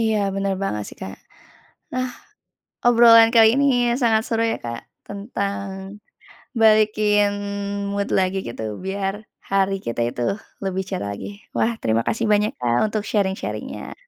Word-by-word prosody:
Iya, 220 Hz, -1 st, +2 dB, 0.2 s
bener 195 Hz, 0 st, -1 dB
banget 105 Hz, -, -2 dB
sih, -, -, -12 dB
Kak. 95 Hz, -, -7 dB, 0.8 s
Ah, 255 Hz, 0 st, -1 dB, 0.8 s
obrolan 230 Hz, -1 st, +7 dB
kali 225 Hz, -1 st, +8 dB
ini 280 Hz, -, +3 dB, 0.4 s
sangat 225 Hz, -2 st, +3 dB
seru 225 Hz, -1 st, 0 dB
ya -, -, -2 dB
Kak, 115 Hz, 0 st, -5 dB, 0.3 s
tentang 200 Hz, -1 st, -4 dB, 1.0 s
balikin 215 Hz, -1 st, +4 dB, 0.6 s
mood 200 Hz, 0 st, -1 dB
lagi, 185 Hz, 0 st, +1 dB
gitu 120 Hz, -, -6 dB, 0.2 s
biar 195 Hz, 0 st, -2 dB, 0.4 s
hari 195 Hz, 0 st, +2 dB
kita 115 Hz, 0 st, -3 dB
itu 120 Hz, -, -5 dB, 0.4 s
lebih 190 Hz, 0 st, -1 dB
cerah 100 Hz, -, -3 dB
lagi. 100 Hz, -, -7 dB, 0.3 s
Wah, 235 Hz, -, +2 dB
terima 115 Hz, 0 st, +1 dB
kasih 225 Hz, 0 st, 0 dB
banyak 210 Hz, +1 st, +2 dB
Kak, 120 Hz, -1 st, +1 dB
untuk 215 Hz, 0 st, -2 dB
sharing-sharing-nya. 195 Hz, -2 st, -3 dB
200 Hz, 135 wpm, -22 LUFS, 190-220 Hz, 1.0 s, kali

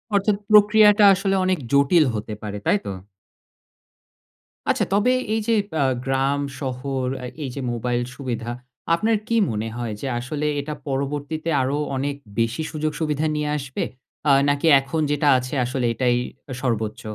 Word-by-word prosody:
অর্থাৎ, 200 Hz, +1 st, +3 dB, 0.2 s
প্রক্রিয়াটা 210 Hz, 0 st, +6 dB
আসলে 195 Hz, +1 st, 0 dB
অনেক 185 Hz, -1 st, +2 dB
জটিল 140 Hz, +3 st, +5 dB
হতে 105 Hz, 0 st, -4 dB
পারে, 105 Hz, -1 st, -5 dB
তাইতো? 205 Hz, -, +1 dB, 1.8 s
আচ্ছা, -, -, +2 dB
তবে 210 Hz, +5 st, +3 dB, 0.2 s
এই 220 Hz, -, +1 dB
যে 230 Hz, -, +3 dB, 0.3 s
আ -, -, +4 dB, 0.2 s
গ্রাম, 135 Hz, +1 st, +1 dB, 0.2 s
শহর 130 Hz, -1 st, -3 dB, 0.2 s
আ -, -, -4 dB, 0.2 s
এই 135 Hz, -, -3 dB
যে 140 Hz, -, -4 dB
মোবাইল 120 Hz, +1 st, -1 dB
সুবিধা, 120 Hz, -3 st, -4 dB, 0.4 s
আপনার 220 Hz, +6 st, +2 dB
কি 230 Hz, -, 0 dB, 0.2 s
মনে 110 Hz, +1 st, -3 dB
হয় 115 Hz, -3 st, -3 dB
যে 135 Hz, -, -3 dB
আসলে 145 Hz, +4 st, -4 dB
এটা 150 Hz, +2 st, -4 dB
পরবর্তীতে 145 Hz, +4 st, -3 dB
আরো 135 Hz, +3 st, 0 dB, 0.2 s
অনেক 140 Hz, +1 st, -2 dB, 0.2 s
বেশি 115 Hz, +6 st, 0 dB
সুযোগ 155 Hz, -1 st, -2 dB
সুবিধা 155 Hz, -1 st, 0 dB
নিয়ে 150 Hz, 0 st, -1 dB
আসবে? 135 Hz, -1 st, -4 dB, 0.4 s
আ -, -, +6 dB, 0.2 s
নাকি 145 Hz, +3 st, +1 dB
এখন 135 Hz, +4 st, -3 dB
যেটা 145 Hz, 0 st, +1 dB
আছে 125 Hz, +2 st, -5 dB
আসলে 125 Hz, 0 st, -2 dB
এটাই 125 Hz, 0 st, +1 dB, 0.4 s
আ -, -, -3 dB
সর্বোচ্চ? 110 Hz, -4 st, -2 dB
140 Hz, 155 wpm, -23 LUFS, 125-160 Hz, 1.8 s, প্রক্রিয়াটা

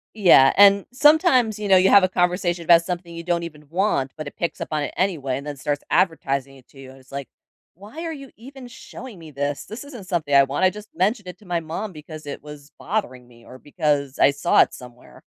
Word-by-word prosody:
Yeah, 170 Hz, -10 st, +6 dB
and 200 Hz, -1 st, +6 dB
sometimes, 265 Hz, -, +3 dB
you 210 Hz, -, -4 dB
know, 190 Hz, -1 st, +6 dB
you 190 Hz, +1 st, +4 dB
have 200 Hz, -2 st, +6 dB
a -, -, +4 dB
conversation 180 Hz, -1 st, 0 dB
about 170 Hz, 0 st, +6 dB
something 175 Hz, -1 st, -6 dB
you 170 Hz, -, -7 dB
don't 170 Hz, -1 st, -1 dB
even 150 Hz, -3 st, -10 dB
want, 170 Hz, -7 st, 0 dB
but 155 Hz, -2 st, -6 dB
it -, -, -9 dB
picks 170 Hz, -, -4 dB
up -, -, -5 dB
on 150 Hz, -1 st, -1 dB
it 140 Hz, -, -5 dB
anyway 150 Hz, -9 st, -1 dB
and 140 Hz, -, -8 dB
then 145 Hz, -1 st, -6 dB
starts 145 Hz, +1 st, -3 dB
advertising 140 Hz, -6 st, 0 dB
it 130 Hz, -, -21 dB
to 135 Hz, -, -18 dB
you, 130 Hz, -1 st, -11 dB
and 135 Hz, -, -16 dB
it's 130 Hz, +1 st, -22 dB
like, 140 Hz, -1 st, -6 dB, 0.5 s
"Why 215 Hz, -, -10 dB
are 325 Hz, -, -4 dB
you 275 Hz, -3 st, -11 dB
even 260 Hz, +2 st, -12 dB
showing 240 Hz, -3 st, -11 dB
me 160 Hz, -2 st, -12 dB
this, 140 Hz, +1 st, -4 dB
this 220 Hz, +6 st, -9 dB
isn't 245 Hz, -9 st, -11 dB
something 160 Hz, -6 st, -2 dB
I 140 Hz, 0 st, +7 dB
want, 140 Hz, +7 st, -1 dB
I -, -, +5 dB
just 210 Hz, +2 st, -11 dB
mentioned 200 Hz, +2 st, 0 dB
it 180 Hz, -, -9 dB
to 210 Hz, -, -19 dB
my 175 Hz, -1 st, -1 dB
mom 170 Hz, +6 st, -6 dB
because 155 Hz, -1 st, -11 dB
it 145 Hz, -, -7 dB
was 150 Hz, 0 st, -12 dB
bothering 130 Hz, -, -4 dB
me 120 Hz, -1 st, -20 dB
or 130 Hz, +1 st, -13 dB
because 145 Hz, -3 st, -2 dB
I 140 Hz, -, +5 dB
saw 140 Hz, -, +3 dB
it -, -, +1 dB
somewhere." 125 Hz, -1 st, -14 dB
170 Hz, 240 wpm, -22 LUFS, 140-200 Hz, 0.5 s, I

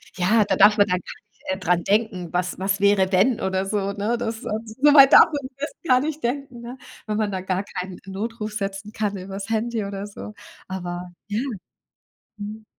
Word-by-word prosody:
Ja, 210 Hz, +4 st, +3 dB
da -, -, +1 dB
darf 210 Hz, +2 st, +6 dB
man 205 Hz, 0 st, +5 dB
dann 180 Hz, -1 st, +1 dB
gar -, -, -11 dB
nicht, -, -, -33 dB
äh, 190 Hz, -, 0 dB
dran 180 Hz, -2 st, +1 dB
denken, 200 Hz, -5 st, 0 dB
was 180 Hz, 0 st, -1 dB
was 195 Hz, 0 st, 0 dB
wäre 200 Hz, -1 st, +4 dB
denn 200 Hz, +6 st, +2 dB
oder 190 Hz, 0 st, -1 dB
so, 200 Hz, 0 st, -1 dB
ne? 215 Hz, +4 st, -1 dB
Das, 225 Hz, -1 st, -3 dB
äh -, -, -3 dB, 0.2 s
soweit 275 Hz, +4 st, +6 dB
darf -, -, +10 dB
man 285 Hz, -4 st, -5 dB
das 290 Hz, +2 st, -4 dB
gar 255 Hz, -4 st, +5 dB
nicht 305 Hz, +1 st, -4 dB
denken, 255 Hz, -1 st, -3 dB
ne? 245 Hz, +2 st, -8 dB, 0.3 s
Wenn 210 Hz, 0 st, -1 dB
man 210 Hz, -2 st, 0 dB
da 190 Hz, -1 st, -3 dB
gar 190 Hz, +1 st, -1 dB
keinen 185 Hz, -1 st, -6 dB
Notruf 215 Hz, +2 st, -5 dB
setzen 200 Hz, 0 st, -4 dB
kann 205 Hz, -2 st, -2 dB
übers 195 Hz, +2 st, -7 dB
Handy 225 Hz, 0 st, -1 dB
oder 200 Hz, 0 st, -5 dB
so. 210 Hz, +1 st, -9 dB, 0.3 s
Aber 180 Hz, -1 st, -5 dB, 0.2 s
ja, 210 Hz, +1 st, -2 dB, 1.0 s
mhm? 215 Hz, +1 st, -7 dB
205 Hz, 195 wpm, -23 LUFS, 190-225 Hz, 1.0 s, darf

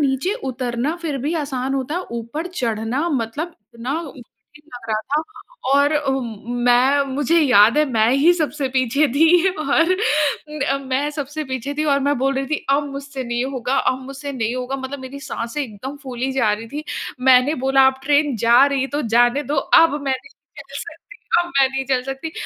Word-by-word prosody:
नीचे 275 Hz, +6 st, 0 dB, 0.2 s
उतरना 250 Hz, +3 st, -2 dB
फिर 330 Hz, -5 st, -4 dB
भी 285 Hz, +5 st, -2 dB
आसान 270 Hz, -4 st, -2 dB
होता 270 Hz, +2 st, -2 dB
है, 365 Hz, -, -2 dB
ऊपर 235 Hz, +8 st, -4 dB
चढ़ना 245 Hz, -1 st, -2 dB
मतलब 285 Hz, +4 st, -3 dB, 0.2 s
इतना 240 Hz, +4 st, -4 dB
मुश्किल 265 Hz, -1 st, -15 dB
लग 235 Hz, -2 st, -10 dB
रहा 215 Hz, -1 st, 0 dB
था। 290 Hz, +7 st, -1 dB, 0.5 s
और 285 Hz, +2 st, +4 dB
अ, 295 Hz, -2 st, 0 dB
मैं 245 Hz, +2 st, +1 dB
मुझे 290 Hz, +4 st, +2 dB
याद 235 Hz, -3 st, +5 dB
है, 305 Hz, -, +5 dB
मैं 220 Hz, -2 st, +3 dB
ही 280 Hz, +7 st, +5 dB
सबसे 295 Hz, -4 st, -2 dB
पीछे 270 Hz, +4 st, +2 dB
थी। 335 Hz, +4 st, +5 dB
और 330 Hz, +1 st, +1 dB, 0.5 s
म 275 Hz, -2 st, -1 dB
मैं 275 Hz, +3 st, 0 dB
सबसे 295 Hz, +1 st, -5 dB
पीछे 260 Hz, +1 st, -4 dB
थी 305 Hz, -, +1 dB
और 280 Hz, -2 st, +2 dB
मैं 285 Hz, +1 st, +1 dB
बोल 270 Hz, +2 st, +1 dB
रही 270 Hz, 0 st, -2 dB
थी, 310 Hz, +2 st, -3 dB
"अब 285 Hz, +1 st, +2 dB
मुझसे 275 Hz, -1 st, -6 dB
नहीं 240 Hz, +1 st, -2 dB
होगा, 260 Hz, -1 st, -2 dB
अब 255 Hz, -, +1 dB
मुझसे 275 Hz, +1 st, -7 dB
नहीं 235 Hz, -2 st, -2 dB
होगा" 255 Hz, +1 st, -3 dB
मतलब 265 Hz, +1 st, -6 dB
मेरी 260 Hz, +2 st, -8 dB
साँसें 255 Hz, 0 st, -4 dB
एकदम 260 Hz, +3 st, -7 dB
फूली 260 Hz, -1 st, -3 dB
जा 235 Hz, -6 st, +2 dB
रही 215 Hz, +2 st, -4 dB
थी। 295 Hz, +5 st, -6 dB, 0.5 s
मैंने 255 Hz, +4 st, +5 dB
बोला 270 Hz, 0 st, +5 dB
"अब 265 Hz, 0 st, +1 dB
ट्रेन 290 Hz, 0 st, +2 dB
जा 240 Hz, +3 st, +7 dB
रही 275 Hz, -1 st, 0 dB
तो 300 Hz, -, -1 dB
जाने 240 Hz, +4 st, +4 dB
दो, 295 Hz, +1 st, -3 dB
अब 295 Hz, +2 st, +4 dB
मैं 270 Hz, -1 st, 0 dB
नहीं 280 Hz, -, -17 dB, 0.2 s
चल -, -, -9 dB, 0.2 s
सकती, 330 Hz, +2 st, -9 dB, 0.4 s
अब 350 Hz, -, +1 dB
मैं 270 Hz, -1 st, +5 dB
नहीं 270 Hz, 0 st, -3 dB
चल 255 Hz, -1 st, +1 dB
सकती।" 270 Hz, +4 st, -5 dB
270 Hz, 190 wpm, -20 LUFS, 250-295 Hz, 0.5 s, जा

